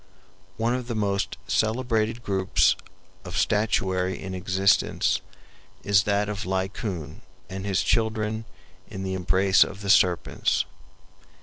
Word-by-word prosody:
One 115 +2 +1
of 125 -1 -3
the 120 - -3
most 100 -2 -1
celebrated 115 0 0
groups 95 -3 +2 0.5
of - - -6
statuary 95 -3 +1
in 95 0 -6
existence 95 +1 +1 0.6
is 100 0 +3
that 100 0 +1
of 105 0 -4
Laocoon 95 - -3 0.3
and 95 +1 -5
his 95 -2 +1
children 110 -1 0 0.4
in 95 -3 -7
the 95 0 -3
embrace 95 +1 +4
of 100 +1 -8
the 100 -1 +2
serpents. 90 -4 +2
100 Hz, 120 wpm, -25 LUFS, 95-110 Hz, 0.6 s, embrace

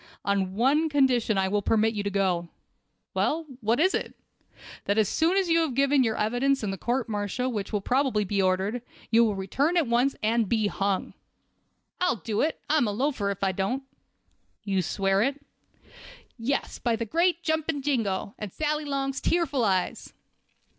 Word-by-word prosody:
"On 195 -2 0
one 285 +8 +3
condition 255 -7 +2
I 190 0 +2
will 205 +2 0
permit 220 +2 +2
you 205 - -2
to 200 - -2
go." 185 -4 0 0.6
"Well, 320 +2 0
what 230 +1 +1
is 375 +4 +3
it?" - - -3 0.7
"That 200 - 0
as 215 -2 +4
soon 330 - +2
as 385 -2 +2
you 335 0 +3
have 315 -7 0
given 275 0 +3
your 225 -2 0
evidence 245 +5 +1
in 205 - -1
the 195 - -4
court 245 +1 -1
martial 215 +4 -2
which 205 -4 -4
will 210 -2 -1
probably 255 -2 +1
be 200 +1 0
ordered, 190 +5 0 0.3
you 230 +1 +6
will 215 -3 +1
return 275 - 0
at 330 - +3
once 245 +3 +2
and 225 -1 +1
be 220 -2 +2
hung." 200 -1 -1 0.9
"I'll 360 -6 +2
do 210 +1 -2
it; 315 - 0
I'm 295 -6 +3
a - - 0
loafer 240 -2 -1
if 200 0 -4
I 195 - +2
don't." 195 +9 -2 0.8
"You 195 -2 0
swear 195 +2 +1
it?" 275 +5 0 1.0
"Yes, 265 +4 -2
by 235 -2 +1
the 230 +1 -3
great 340 - +1
jumping 315 -3 -1
jingo, 215 -8 -1
and 210 -3 -5
Sally 300 - -1
Long's 275 -1 -2
tearful 295 -7 +1
eyes!" 190 -4 -1
230 Hz, 180 wpm, -26 LUFS, 200-280 Hz, 1.0 s, you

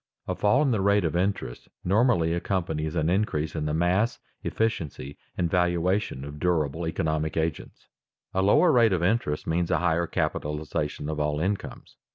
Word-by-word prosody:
_A - - -1
fall 125 +8 +3
in 140 - +2
the 110 -4 +1
rate 100 -1 +3
of 80 - -1
interest 90 -9 -2
normally 95 -4 +3
accompanies 85 -3 -2
an 80 -2 +1
increase 85 -5 0
in 75 -2 -2
the 75 - -1
mass, 90 +7 +1 0.3
efficiency, 80 -11 -2 0.2
and 90 - +1
valuation 90 -3 0
of 75 +1 -8
durable 80 -2 0
economic 80 -1 -1
agents._ 80 -1 -3 0.5
A 95 - +1
lower 105 - +5
rate 115 -5 +4
of 85 -2 0
interest 90 -6 0
means 85 +1 0
a - - +2
higher 85 -1 +1
capitalization 75 -1 -2
of 75 0 -3
all 75 0 0
incomes. 95 +4 -4
85 Hz, 165 wpm, -26 LUFS, 75-95 Hz, 0.5 s, lower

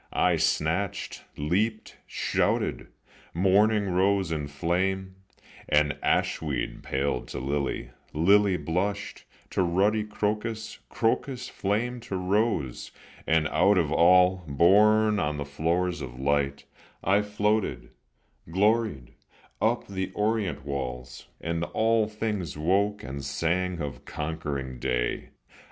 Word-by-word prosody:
I - - +3
snatched, 85 +5 -1
leaped, 105 +9 -1
shouted; - - 0 0.5
morning 100 +3 +3
rose 95 0 +2
in 75 -3 -2
flame, 95 +5 -1 0.5
And 75 0 +3
ashweed 70 -6 -1
paled 70 +2 -2
to - - -5
lily, 70 -2 -2 0.2
lily 95 +4 +4
blushed 90 +6 -3 0.3
To - - +1
ruddy 100 +5 +2
crocus, 105 +1 -3
crocus 125 +2 -1
flamed 120 +5 -2
to 100 - -5
rose, 95 - 0 0.4
And 80 -1 +3
out 95 +5 +4
of 80 -4 +1
all, 90 +2 +5
borne 105 +8 +4
on 75 0 -1
the 70 - -3
floors 85 +5 -1
of 60 -1 -7
light, 70 0 0 0.4
I 100 +2 +3
floated, 105 0 -1 0.6
gloried, 105 - +1 0.5
up 115 +3 +1
the 95 -1 -4
orient 105 -8 -1
walls, 65 -3 -5
And 85 0 -2
all 110 +3 +2
things 105 -7 -3
woke, 100 +6 +1
and 70 +1 -6
sang 85 +5 -1
of 70 -5 -6
conquering 70 -5 -4
day. - - -1
90 Hz, 110 wpm, -27 LUFS, 75-105 Hz, 0.6 s, all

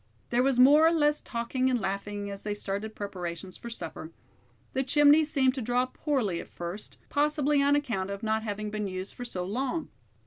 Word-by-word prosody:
There 240 +1 +3
was 265 -1 +2
more 290 +5 +7
or - - +4
less 295 -2 +2
talking 255 +2 -1
and 250 -2 +1
laughing 200 0 -3
as 195 - -7
they 210 -1 -3
started 205 +2 -4
preparations 185 -2 -6
for 235 - -8
supper. 165 -7 -7 0.6
The 265 - +1
chimney 295 +3 +6
seemed 275 -4 +2
to 265 - -4
draw 245 +2 +1
poorly 255 - -1
at - - -13
first, 175 +4 -6
possibly 295 0 +2
on 285 +1 +4
account 225 -10 -1
of 200 +1 -5
not 220 0 +1
having 210 -1 -4
been 210 -1 -2
used 185 0 -5
for 245 - -7
so 185 -7 -4
long. 265 - -2
235 Hz, 195 wpm, -28 LUFS, 200-280 Hz, 0.6 s, more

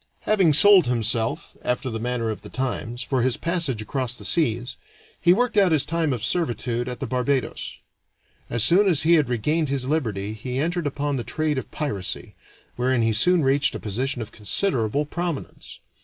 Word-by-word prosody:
Having 190 -7 +3
sold 190 0 +7
himself, 115 -1 0
after 125 +1 -2
the 110 - -3
manner 120 -1 -2
of 110 - -7
the - - -11
times, 125 -2 -3
for 130 -3 -1
his 130 0 +1
passage 165 -10 -1
across 125 +1 -3
the - - -10
seas, 125 -5 0 0.5
he 175 - +5
worked 235 +4 +1
out 195 -4 +5
his 150 -3 +2
time 160 -1 -1
of 120 -4 -3
servitude 120 -7 -1
at 125 - -6
the - - -3
Barbados. 130 +1 -2 0.7
As 120 -2 +1
soon 190 - +5
as 160 -4 +2
he 165 +2 +4
had 150 -6 +3
regained 150 +6 0
his 135 -2 0
liberty 110 -9 -2
he 125 +4 -5
entered 170 +2 -1
upon 145 0 -2
the 120 - -3
trade 155 0 -1
of - - -9
piracy, 105 -12 -4 0.4
wherein 125 -1 +1
he 115 0 +2
soon 175 +9 +3
reached 135 +2 +2
a - - -4
position 120 +4 -2
of 110 - -12
considerable 115 - -1
prominence. 170 -1 -5
130 Hz, 185 wpm, -23 LUFS, 120-160 Hz, 0.7 s, sold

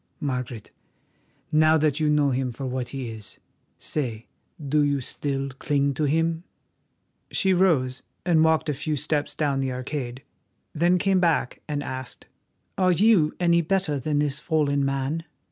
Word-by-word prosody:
Margaret, 125 - -4 0.8
now 155 +1 +5
that 150 -1 +1
you 155 -1 +2
know 150 -2 +3
him 130 0 -1
for 135 +3 -6
what 130 -1 -3
he 130 -4 -5
is, 110 -2 -8 0.4
say, 120 -7 -3 0.3
do 150 0 +1
you 145 -1 +2
still 135 +1 -3
cling 140 +1 0
to 150 +3 -1
him?" 165 +3 +1 0.9
She 190 -1 +2
rose 140 -9 +2 0.2
and 165 -3 +4
walked 160 0 +3
a 150 - +1
few 150 +3 -2
steps 150 +1 -1
down 140 -3 0
the 135 -1 -1
arcade, 130 0 -5 0.5
then 175 +3 +3
came 190 +1 +2
back 165 -7 +1
and 145 -1 -2
asked: 130 -1 -6 0.5
"Are 185 -1 +4
you 180 -4 +4
any 170 -1 +4
better 170 -4 0
than 145 +3 -1
this 145 -1 0
fallen 145 -3 +1
man?" 135 +4 -1
145 Hz, 155 wpm, -25 LUFS, 135-160 Hz, 0.9 s, now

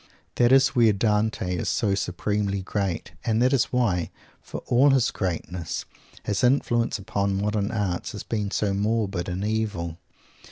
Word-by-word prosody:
That 120 0 +4
is 135 0 +6
where 120 -5 +4
Dante 105 -3 0
is - - -2
so 105 -4 +1
supremely 100 +1 -1
great. 95 -4 -2
And 110 -2 +1
that 130 +3 +3
is 130 - +3
why, 100 -9 0 0.3
for - - -8
all 130 +4 +4
his 135 -3 +3
greatness, 90 -2 -3 0.4
his 105 +3 -1
influence 120 -3 +2
upon 100 -1 -1
modern 105 0 0
art 100 -6 -2
has 105 - -7
been 105 -3 -2
so 100 -1 0
morbid 100 -3 -1
and 90 +3 -3
evil. 105 -7 -2
105 Hz, 155 wpm, -25 LUFS, 95-115 Hz, 0.4 s, is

